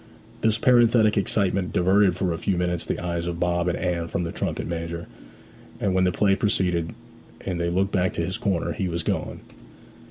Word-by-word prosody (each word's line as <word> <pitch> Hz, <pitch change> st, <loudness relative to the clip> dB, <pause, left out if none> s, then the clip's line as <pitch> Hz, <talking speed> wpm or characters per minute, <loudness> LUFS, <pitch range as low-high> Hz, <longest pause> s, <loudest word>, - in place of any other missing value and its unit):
This 110 Hz, 0 st, +2 dB
parenthetic 120 Hz, -5 st, +4 dB
excitement 100 Hz, -2 st, 0 dB
diverted 95 Hz, +1 st, +3 dB
for 90 Hz, -2 st, -1 dB
a 80 Hz, -, -5 dB
few 95 Hz, 0 st, 0 dB
minutes 90 Hz, -1 st, -1 dB
the -, -, -1 dB
eyes 85 Hz, -1 st, -3 dB
of 85 Hz, -1 st, -4 dB
Bob 85 Hz, 0 st, 0 dB
and 90 Hz, -, 0 dB
Anne 85 Hz, -2 st, -2 dB
from 85 Hz, -, -2 dB
the 85 Hz, -, -3 dB
trumpet -, -, -3 dB
major; 85 Hz, 0 st, -4 dB, 0.7 s
and 100 Hz, -2 st, 0 dB
when 95 Hz, 0 st, +3 dB
the 90 Hz, -, +2 dB
play 100 Hz, +2 st, +2 dB
proceeded, 90 Hz, -5 st, 0 dB, 0.5 s
and 90 Hz, -3 st, -2 dB
they 85 Hz, -, 0 dB
looked 95 Hz, +3 st, 0 dB
back 95 Hz, -2 st, +1 dB
to 85 Hz, -, -1 dB
his 95 Hz, +5 st, -3 dB
corner, 95 Hz, -7 st, -1 dB
he 95 Hz, -, -2 dB
was 85 Hz, 0 st, -3 dB
gone. -, -, -3 dB
90 Hz, 195 wpm, -24 LUFS, 85-100 Hz, 0.7 s, parenthetic